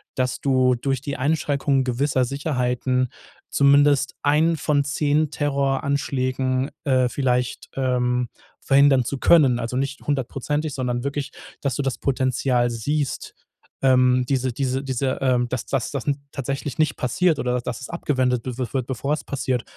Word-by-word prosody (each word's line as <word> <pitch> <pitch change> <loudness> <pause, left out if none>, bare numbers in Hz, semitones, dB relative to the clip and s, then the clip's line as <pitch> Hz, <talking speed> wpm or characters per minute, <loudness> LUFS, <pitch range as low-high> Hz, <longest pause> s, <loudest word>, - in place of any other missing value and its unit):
dass 130 -1 -1
du 130 -2 +3
durch 135 +1 -2
die 140 0 -4
Einschränkung 140 -1 +1
gewisser 130 +1 +1
Sicherheiten 130 -2 -1 0.4
zumindest 140 0 +4
einen 155 +3 +3
von 145 -2 +1
10 150 +1 +1
Terroranschlägen, 135 -2 0 0.2
äh, 130 -3 +3
vielleicht, 125 -1 -1
ähm, 125 -2 0 0.3
verhindern 135 -1 +4
zu 140 - -3
können, 135 -7 +5
also 115 +2 -3
nicht 140 +1 -2
hundertprozentig, 145 +2 -2
sondern 125 -2 -2
wirklich, 140 0 -3 0.3
dass 135 -4 -1
du - - -1
das 135 -2 -2
Potenzial 130 -2 +1
siehst, 140 +5 -2 0.5
ähm, 125 -1 +4
diese 130 -2 0
diese 130 +1 -1
diese 130 0 -1
ähm, 125 -2 +2
dass 125 -2 -3
das 135 -4 -1
das 140 -1 -4
n 140 -1 +1
tatsächlich 140 +1 -4
nicht 155 - +2
passiert 165 +4 +1
oder 125 0 0
dass 120 0 -5
es 130 - -8
abgewendet 130 -7 0
wi 125 -2 -5
wi 130 - -1
wird, 130 -3 -1
bevor 135 +3 -2
es 155 - -3
passiert. 130 -3 -2
135 Hz, 150 wpm, -23 LUFS, 125-140 Hz, 0.5 s, können